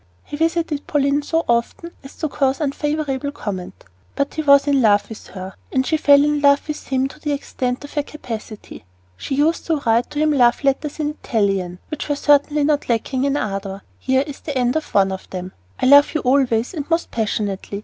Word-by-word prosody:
He - - -7
visited 325 -1 -1
Pauline 285 0 +1
so 325 +3 -1
often 235 +8 -1
as 270 - -12
to 315 - -2
cause 270 -1 0
unfavorable 295 -1 -2
comment; 190 -8 -6 0.3
but 280 - -1
he 315 - -2
was 280 -2 +5
in 280 -2 +2
love 205 -3 +3
with 220 - -10
her, 190 0 -8 0.2
and 260 0 +1
she 315 - +1
fell 285 -2 +5
in 295 0 +1
love 280 0 +4
with 300 -1 -6
him 265 0 +1
to 305 - -14
the 295 -1 -2
extent 255 -2 -3
of 285 - -10
her 295 - +1
capacity. 230 - -8 0.3
She 270 - -4
used 310 +4 +1
to 325 - +2
write 230 +1 +2
him 305 +1 +2
love 245 -2 +3
letters 280 +3 -1
in 300 -1 0
Italian, 195 -5 0
which 305 0 -5
were 290 - +1
certainly 290 +1 +3
not 290 -2 0
lacking 255 +3 0
in 280 +1 +1
ardor. 195 -3 -4 0.2
Here 265 +1 +1
is 285 -2 -8
the 290 -4 -4
end 250 +1 +1
of 315 - -3
one 195 -1 +4
of 190 - -7
them: 185 0 -6 0.3
I - - 0
love 285 +4 +6
you 310 - +1
always 250 -2 +1
and 295 -4 -5
most 330 0 0
passionately. 205 -3 -2
275 Hz, 205 wpm, -20 LUFS, 230-295 Hz, 0.3 s, love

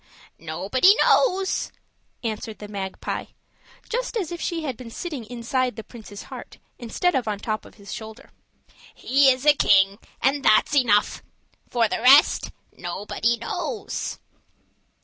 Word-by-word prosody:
"Nobody 195 - +3
knows," 385 -5 +2 0.5
answered 220 -1 -4
the 210 - -9
magpie, 195 -2 -5 0.6
just - - -2
as 365 -7 -3
if 345 - -6
she 330 -2 -2
had 265 -5 -3
been 245 0 -10
sitting 275 0 -6
inside 245 +1 -2
the 220 - -7
prince's 215 -3 -11
heart, - - -10 0.2
instead 265 +9 0
of 255 -5 -1
on 210 -1 -1
the 200 - -19
top 215 -2 -3
of - - -15
his 200 -2 -10
shoulder. 220 +4 -9 0.6
"He 275 +1 +4
is 255 +1 +1
a 295 - +8
king, 195 -6 +3 0.2
and 275 +1 +1
that's 215 +7 +4
enough. 225 -7 +3 0.5
For 235 -2 +2
the 215 - -3
rest 270 +4 +6 0.3
nobody 205 +6 -2
knows." 400 - -4
240 Hz, 145 wpm, -24 LUFS, 215-290 Hz, 0.6 s, a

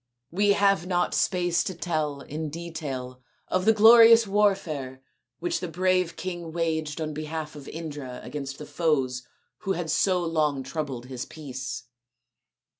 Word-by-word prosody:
" 120 +1 -53
We 200 +3 +3
have 195 -4 +2
not 180 -1 +1
space 175 -2 +1
to 185 - -4
tell 155 -5 -2
in 155 +2 -5
detail 145 -6 -6 0.3
of 185 0 0
the 220 - +7
glorious 230 +1 +8
warfare 180 -11 0 0.3
which 175 +1 -1
the 180 - -4
brave 180 +1 +1
king 175 -3 -5
waged 160 -2 -2
on 155 -1 -3
behalf 155 0 -5
of 145 -2 -10
Indra 145 -6 -6
against 135 -2 -6
the 150 - -8
foes 135 -7 0 0.3
who 195 - -1
had 165 -3 -3
so 180 +1 +2
long 150 -4 0
troubled 135 -4 -4
his 125 -1 -6
peace. 130 -5 -6
160 Hz, 150 wpm, -26 LUFS, 145-180 Hz, 0.3 s, glorious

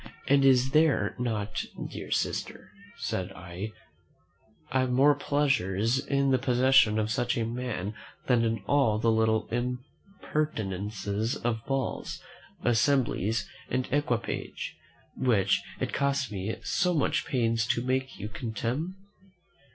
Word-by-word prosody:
"And 140 0 +5
is 130 -1 +5
there 150 -9 +3
not, 110 -4 -2 0.3
dear - - -7
sister," - - -2 0.3
said 90 -1 -3
I, 95 +4 -6 1.2
"more 135 +4 +5
pleasure 140 -9 +1 0.3
in 140 -1 +2
the 130 - +3
possession 125 -3 +4
of 110 0 0
such 120 0 0
a 115 - 0
man 115 -4 -3 0.3
than 120 -3 +3
in 115 -3 -1
all 135 -5 +3
the 115 +1 +2
little 110 -1 +2
impertinences 115 - -3
of 115 -2 -2
balls, 135 -2 -2 0.4
assemblies, 120 -3 +2 0.2
and 130 0 0
equipage, 130 -4 -2 0.4
which 105 -7 +2 0.2
it - - -2
cost 140 -4 0
me 100 +2 -3
so 180 -2 +1
much 150 +1 +1
pains 115 -3 +1
to 125 -1 +1
make 130 +1 -1
you 105 - -5
contemn?" 120 - -3
120 Hz, 120 wpm, -28 LUFS, 110-135 Hz, 1.2 s, And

